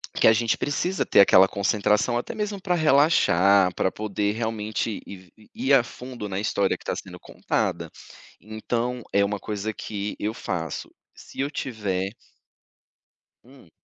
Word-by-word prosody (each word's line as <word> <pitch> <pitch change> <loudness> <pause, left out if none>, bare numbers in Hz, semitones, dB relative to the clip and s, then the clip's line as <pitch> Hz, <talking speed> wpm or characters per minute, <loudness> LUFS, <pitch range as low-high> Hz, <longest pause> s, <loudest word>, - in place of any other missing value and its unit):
Que - - +4
a 110 - +7
gente 115 0 +1
precisa 180 +6 -1
ter - - +6
aquela 95 -1 +7
concentração, 105 +4 +1
até - - -6
mesmo 210 -2 -3
para 180 -2 0
relaxar, 100 - +4
pra 95 - 0
poder 105 -1 -2
realmente 110 -1 -3
ir 100 - -8
v 90 -2 -19
i 110 - -21 0.2
ir 140 - +6
a 130 - +6
fundo 125 -3 -8
na 95 0 -3
história 100 -1 0
que - - -19
está - - -2
sendo - - -9
contada. - - -2 0.5
Então, 120 +3 -3
é 100 0 +3
uma 100 0 -3
coisa 105 +1 -4
que 105 -1 -5
eu 105 - -1
faço. 80 - -5 0.2
Se - - -14
eu 140 +1 0
tiver 100 -8 -3 1.3
Hum. 130 -8 -18
110 Hz, 160 wpm, -24 LUFS, 100-125 Hz, 1.3 s, a